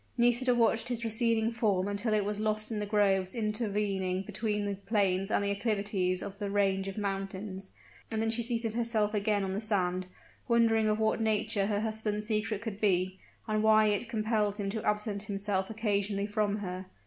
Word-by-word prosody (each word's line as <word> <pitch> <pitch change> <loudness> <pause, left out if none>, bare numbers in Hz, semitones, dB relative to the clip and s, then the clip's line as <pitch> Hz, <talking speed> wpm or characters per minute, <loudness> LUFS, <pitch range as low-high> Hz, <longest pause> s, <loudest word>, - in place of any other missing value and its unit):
Nisida 245 +1 +3
watched 230 -1 +2
his 240 -2 -2
receding 225 0 +2
form 205 -5 +1
until 205 +3 -1
it 210 -2 +1
was 210 0 -2
lost 215 +1 -1
in 215 - -2
the 210 - -3
groves 195 -2 +2
intervening 205 -4 -1
between 210 0 -2
the 200 - -1
plains 195 -1 0
and 210 - +1
the 200 - 0
acclivities 200 -4 0
of 200 0 -8
the 205 -2 -2
range 195 -1 +1
of 195 - -6
mountains; 195 -1 -4 0.4
and 220 - -2
then 225 0 +1
she 230 +1 +1
seated 230 -1 -2
herself 225 -2 +1
again 205 -1 +1
on 190 -1 -2
the 200 - -2
sand, 185 -4 0 0.4
wondering 225 -2 +3
of 215 - +1
what 220 +1 +1
nature 215 -2 +1
her 205 -1 0
husband's 215 -1 -2
secret 215 -1 -1
could 220 -3 -5
be, 185 -2 +1 0.3
and 215 -1 +1
why 215 0 +5
it 210 +2 0
compelled 215 -2 0
him 200 -2 -3
to 220 0 -4
absent 210 -1 -1
himself 200 -2 -1
occasionally 205 -2 0
from 210 -1 0
her. 185 -2 -5
210 Hz, 185 wpm, -30 LUFS, 200-220 Hz, 0.4 s, why